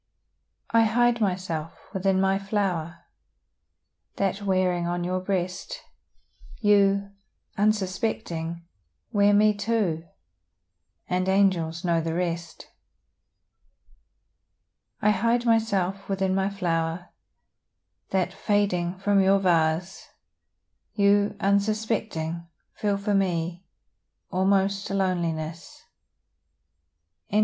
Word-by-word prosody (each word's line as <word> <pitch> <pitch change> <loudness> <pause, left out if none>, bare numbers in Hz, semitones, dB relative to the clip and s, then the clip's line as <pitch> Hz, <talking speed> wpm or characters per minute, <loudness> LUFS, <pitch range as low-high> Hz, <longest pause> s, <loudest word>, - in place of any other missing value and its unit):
I 230 0 +5
hide 240 +1 +2
myself 180 -5 -2 0.2
within 190 0 +1
my 195 0 +2
flower, 180 -5 -2 1.1
That 195 +1 -1
wearing 185 -3 +1
on 175 0 -2
your 185 +1 -1
breast, 185 -1 -3 0.8
You, 200 -2 +3 0.4
unsuspecting, 185 -5 -1 0.5
wear 205 -2 +4
me 210 +1 +5
too 205 -6 -1 1.0
And 185 +1 0
angels 185 -4 +1
know 170 -1 +2
the 165 0 -3
rest. 170 -1 -3 2.4
I 210 - +5
hide 230 +4 +1
myself 200 -5 +1
within 190 -1 0
my 195 +1 +1
flower, 170 -3 -2 1.0
That, 190 -2 0
fading 185 -4 0
from 200 +1 +2
your 195 +1 +4
vase, 175 -1 0 0.9
You, 205 0 +3
unsuspecting, 200 -5 -1 0.3
feel 205 -1 -1
for 200 +1 -1
me 175 -2 -1 0.7
Almost 195 +1 +1
a 195 - -2
loneliness. 170 -4 -2 1.5
VIII. 210 - +2
190 Hz, 90 wpm, -26 LUFS, 175-200 Hz, 2.4 s, I